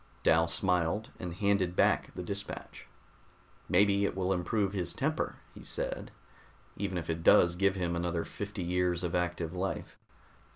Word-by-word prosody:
Dal 80 +1 +5
smiled 90 +4 0
and 90 -2 -4
handed 100 -3 +1
back - - +3
the 90 - -4
dispatch. 100 +3 -6 0.8
"Maybe 100 +2 +4
it 100 - 0
will 95 0 +1
improve 95 +2 0
his 90 -3 -2
temper," - - -1 0.2
he - - -12
said, - - -4 0.7
"even 95 -2 -2
if 85 -1 -4
it 80 0 -2
does 85 0 +6
give 100 +1 +2
him 85 -2 -1
another 85 -1 -1
fifty 100 -2 -5
years 90 0 0
of 85 - -2
active 85 -1 -1
life." 95 +1 -4
90 Hz, 155 wpm, -31 LUFS, 85-100 Hz, 0.8 s, does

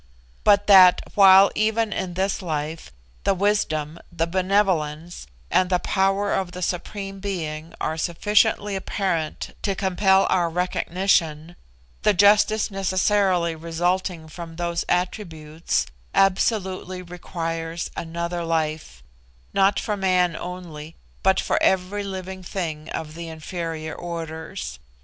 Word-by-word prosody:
But 205 -1 +5
that, 185 -3 +8
while 195 0 +7
even 220 0 +1
in 180 -2 -4
this 190 +2 -1
life, 155 - -4 0.3
the 195 - +2
wisdom, 170 -6 0
the 165 -1 0
benevolence, 175 - 0 0.2
and 185 -1 +3
the 180 - +3
power 195 +2 +1
of 185 -2 -2
the 180 0 -5
Supreme 195 +3 -4
Being 165 -5 -5
are 160 - -2
sufficiently 205 +4 +1
apparent 185 -4 -2
to 200 -2 -1
compel 190 0 +3
our 175 -2 +2
recognition, 175 -2 0 0.5
the 210 - +3
justice 210 +2 +4
necessarily 190 -2 +1
resulting 170 +1 -2
from 165 +1 -9
those 170 0 -2
attributes, 165 -4 -1 0.3
absolutely 190 -1 +1
requires 165 -1 -5
another 170 +1 -4
life, 155 - -2 0.5
not 195 +1 +3
for 210 - -2
man 185 -3 +2
only, 165 -4 -8 0.3
but 190 0 +3
for - - 0
every 190 +2 +1
living 190 -1 -6
thing 165 -4 -5
of 155 -1 -5
the 170 +1 -7
inferior 160 0 -5
orders. 165 - -6
180 Hz, 115 wpm, -23 LUFS, 165-195 Hz, 0.5 s, that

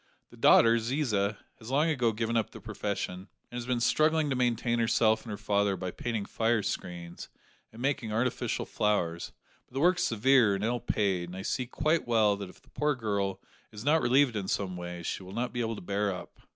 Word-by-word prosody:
The - - -15
daughter, 115 0 +6
Ziza, 110 -5 0 0.2
has 110 - -10
long 150 +5 +2
ago 125 -6 +2
given 115 +1 -2
up 115 -2 +1
the - - -11
profession, 100 -3 -4 0.2
and 120 - -6
has 120 - -7
been 125 -1 +1
struggling 155 +4 +2
to - - +1
maintain 120 -1 +1
herself 110 -1 +3
and 115 - -11
her 105 - -4
father 100 -1 +1
by 95 -1 -4
painting 115 -2 -3
fire 115 0 +1
screens, 85 -3 -5 0.4
and 115 +3 -9
making 135 -5 -1
artificial 120 +3 -1
flowers; 85 -5 -1 0.4
but - - -20
the - - 0
work 180 +4 +4
is - - +1
severe 115 -2 +4
and 100 - -4
ill 120 +2 0
paid, 95 -6 0
and 90 - -8
I 95 - -5
see 125 +4 -2
quite 155 +5 0
well 110 -3 +3
that 100 -2 -6
if - - -17
the - - -25
poor 150 0 0
girl 100 -5 -2 0.3
is 105 +2 -9
not 160 +2 +4
relieved 130 -1 +3
in 100 -3 -3
some 95 -2 -1
way 90 -1 -6
she 85 - -3
will 95 0 -10
not 120 +3 -2
be 120 - -1
able 115 -1 -2
to - - -8
bear 100 +2 0
up." 90 -2 -8
110 Hz, 215 wpm, -29 LUFS, 100-125 Hz, 0.4 s, daughter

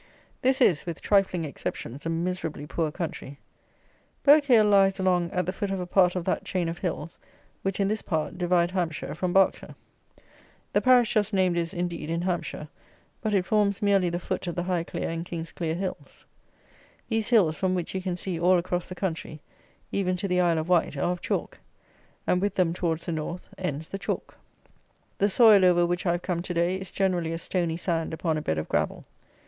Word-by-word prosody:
This 260 +1 +2
is, 180 -9 +3
with 170 - -4
trifling 190 -4 +2
exceptions, 140 -1 -5
a - - -1
miserably 165 -3 -3
poor 160 +1 -1
country. 150 -4 -6 0.9
Burghclere 280 -6 +6
lies 195 -1 +4
along 180 -2 +2
at 180 +1 -1
the 185 - -2
foot 205 -2 -3
of 195 -1 -2
a 180 - -3
part 180 0 +3
of 180 -2 -2
that 185 - 0
chain 180 -3 -1
of 165 +1 -4
hills, 165 -2 -4 0.4
which, 195 0 -2
in 200 - +2
this 215 +1 -1
part, 160 -4 -2
divide 175 -1 +2
Hampshire 175 -4 -2
from 180 +3 -2
Berkshire. 190 +1 +2 1.0
The - - +3
parish 250 -3 +5
just 215 -1 +1
named 185 -2 +2
is, 170 -1 -1
indeed, 175 -3 -3
in 170 +1 -1
Hampshire, 175 -4 -3 0.5
but 215 -2 0
it 185 -2 +2
forms 205 -1 +2
merely 195 -3 +3
the 170 - -2
foot 180 - -4
of 175 - -3
the 175 - -1
Highclere 175 -2 -2
and 165 0 -3
Kingsclere 165 -1 -4
Hills. 185 +1 -6 0.8
These 225 -2 -1
hills, 195 -10 +4
from 185 +2 0
which 175 -2 -3
you 190 - -2
can 185 -1 -2
see 180 -1 -3
all 180 +2 +4
across 175 0 -2
the 185 - -7
country, 165 -4 -4 0.5
even 185 -2 0
to 195 - -3
the 180 -1 +2
Isle 170 -2 +2
of 160 +1 -2
Wight, 175 -5 +2
are 175 - +1
of 180 - -4
chalk, - - -3 0.7
and 180 - +2
with 205 +1 -1
them, 175 -3 +2
towards 170 -2 -2
the 175 - -3
North, 165 +3 -4
ends 160 -4 -4
the 195 - -5
chalk. - - -4 0.8
The 200 - +3
soil 210 -2 +7
over 175 -1 +5
which 175 +1 -2
I 170 - +3
have 175 - -3
come 175 -2 -1
to 175 0 -5
day, 170 +2 +1
is 190 -1 -7
generally 180 -4 0
a - - -2
stony 170 -1 -1
sand 165 -2 -2
upon 160 -1 -1
a 155 - -2
bed 80 - -1
of 80 - -3
gravel. - - -1
180 Hz, 200 wpm, -26 LUFS, 170-190 Hz, 1.0 s, soil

